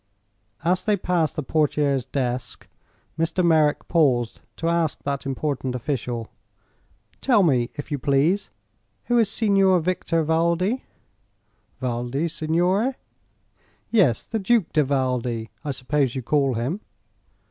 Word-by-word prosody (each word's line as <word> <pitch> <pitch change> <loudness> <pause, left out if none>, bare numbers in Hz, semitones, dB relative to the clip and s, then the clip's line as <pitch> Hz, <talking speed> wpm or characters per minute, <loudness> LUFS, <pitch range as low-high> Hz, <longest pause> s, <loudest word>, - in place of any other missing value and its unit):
As 180 +3 +1
they 210 -1 +2
passed 175 -4 0
the 155 - -2
portiere's 145 -3 +1
desk 125 -2 -3 0.5
Mr. 165 +2 +1
Merrick 155 -3 +3
paused 130 -8 +2
to 165 - -3
ask 170 -3 0
that 140 -1 -3
important 135 -1 -2
official: 120 -3 -3 0.9
"Tell 240 -7 +4
me, 125 -7 +2
if 145 +1 -7
you 145 - -1
please, 145 +9 +1 0.5
who 240 -1 +2
is 220 -3 +3
Signor 195 -4 +3
Victor 165 -1 0
Valdi?" 170 - +1 1.0
"Valdi, 125 +4 -2
signore?" 175 - +1 1.0
"Yes; 170 - +3
the 225 - -3
Duke 215 -1 +1
di 155 - +4
Valdi, 125 -5 -1
I 150 - -4
suppose 135 0 0
you 130 - -3
call 135 -1 +1
him." 135 - -2
150 Hz, 125 wpm, -23 LUFS, 130-180 Hz, 1.0 s, Tell